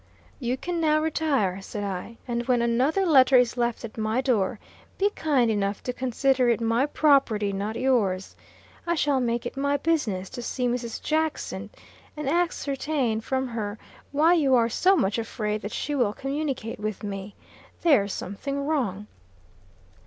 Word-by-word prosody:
"You 250 -1 -1
can 345 +3 -3
now 310 -1 +3
retire," 290 - 0
said 205 +1 -6
I, 200 +3 -5
"and 240 0 -2
when 245 -2 +3
another 260 +11 +2
letter 270 -5 +6
is 245 -1 +3
left 240 -1 -1
at 225 0 -9
my 220 +3 0
door, 240 -5 +1 0.4
be 405 +1 +2
kind 270 - +1
enough 200 -1 -1
to 250 - -3
consider 260 0 +1
it 235 - +2
my 230 +4 +1
property, 265 -10 +3
not 205 +3 -3
yours. 220 -8 0 0.5
I 340 - +2
shall 290 -4 +2
make 235 -1 -1
it 240 - -5
my 280 +1 +1
business 265 - 0
to 245 - -6
see 250 +1 -2
Mrs. 240 -1 -3
Jackson, 315 0 -1 0.5
and 300 -2 -4
ascertain 280 -7 0
from 260 +2 -2
her 215 -2 -4 0.3
why 310 +4 +4
you 285 -6 +4
are 230 -1 +3
so 375 - +3
much 210 - +1
afraid 215 -2 -3
that 205 - -5
she 295 - -3
will 245 -7 +1
communicate 270 -5 -3
with 215 -1 -4
me. 200 0 -6 0.5
There's 250 - +4
some 190 - -5
thing 280 +6 -3
wrong." 235 -10 -1
245 Hz, 165 wpm, -26 LUFS, 215-285 Hz, 0.5 s, letter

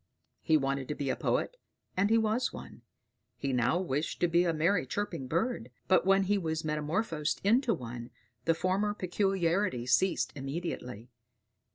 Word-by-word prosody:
He 160 - +4
wanted 135 -2 -1
to 150 - -3
be 140 -2 -1
a - - -1
poet, - - -1 0.4
and 200 +3 +2
he 225 - +5
was 220 +3 +1
one; - - -10 0.6
he 140 -1 -2
now 125 +7 +2
wished 155 -4 -2
to 175 - +4
be 170 +1 +3
a 170 - +2
merry 165 -1 +1
chirping 165 -5 -3
bird: 170 - -1 0.2
but 185 0 +4
when 195 0 +5
he 200 +1 +1
was 160 -2 -2
metamorphosed 150 +2 -1
into 230 +3 +3
one, 120 -3 -7 0.4
the 165 - +3
former 195 +4 0
peculiarities 180 - 0
ceased 190 -1 +2
immediately. 135 -5 -5
170 Hz, 160 wpm, -31 LUFS, 135-195 Hz, 0.6 s, he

